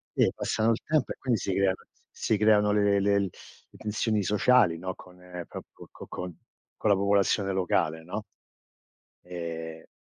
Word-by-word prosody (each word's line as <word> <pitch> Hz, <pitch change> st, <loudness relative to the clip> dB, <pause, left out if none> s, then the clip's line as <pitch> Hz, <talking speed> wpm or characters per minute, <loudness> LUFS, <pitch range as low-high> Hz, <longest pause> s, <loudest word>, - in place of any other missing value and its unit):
si -, -, +4 dB
passano 110 Hz, +1 st, +1 dB
il 115 Hz, -, 0 dB
tempo 155 Hz, -4 st, +1 dB
e -, -, -21 dB
quindi 120 Hz, -5 st, 0 dB
si 95 Hz, -, -2 dB
creano 95 Hz, 0 st, +2 dB, 0.4 s
si 110 Hz, -, +1 dB
creano 105 Hz, 0 st, +4 dB
le 100 Hz, -1 st, +3 dB
le 100 Hz, 0 st, +3 dB
le 100 Hz, -1 st, -1 dB, 0.5 s
tensioni 105 Hz, 0 st, 0 dB
sociali, 105 Hz, -3 st, +4 dB
no, 95 Hz, +2 st, -4 dB
con 90 Hz, 0 st, -15 dB, 0.3 s
proprio -, -, -11 dB
con -, -, -11 dB
con 90 Hz, -3 st, -6 dB, 0.4 s
con 110 Hz, -, 0 dB
la -, -, +6 dB
popolazione 100 Hz, 0 st, +2 dB
locale, 85 Hz, -3 st, 0 dB
no, 100 Hz, +5 st, -5 dB, 1.0 s
ehm 80 Hz, -2 st, -6 dB
100 Hz, 155 wpm, -28 LUFS, 90-105 Hz, 1.0 s, la